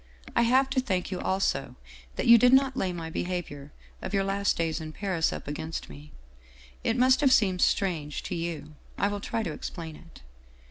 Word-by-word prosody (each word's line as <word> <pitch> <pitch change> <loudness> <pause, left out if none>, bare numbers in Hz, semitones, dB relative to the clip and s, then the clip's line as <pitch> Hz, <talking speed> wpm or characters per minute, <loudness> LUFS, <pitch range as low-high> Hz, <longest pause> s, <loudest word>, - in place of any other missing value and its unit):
I - - +4
have 255 +3 +4
to 265 - +2
thank 195 -9 -2
you 185 - -3
also 190 +1 -1 0.4
that - - -2
you 235 -1 +8
did 250 +3 +5
not 265 0 +4
lay 190 -8 -1
my 165 -2 -6
behavior 160 -6 -4 0.3
of - - -3
your 195 - +2
last 200 +1 0
days 165 -1 -1
in 155 0 -7
Paris 185 -3 0
up - - -7
against 155 - -5
me. 75 +1 -12 0.7
It 225 - 0
must 255 +2 +4
have 275 -3 +4
seemed 190 -7 +3
strange 160 -7 0
to - - -5
you. 165 -2 -4 0.2
I 200 - +1
will 205 0 -4
try 225 +2 -2
to 165 -7 -3
explain 160 -1 -7
it. 165 - -16
185 Hz, 195 wpm, -27 LUFS, 160-225 Hz, 0.7 s, you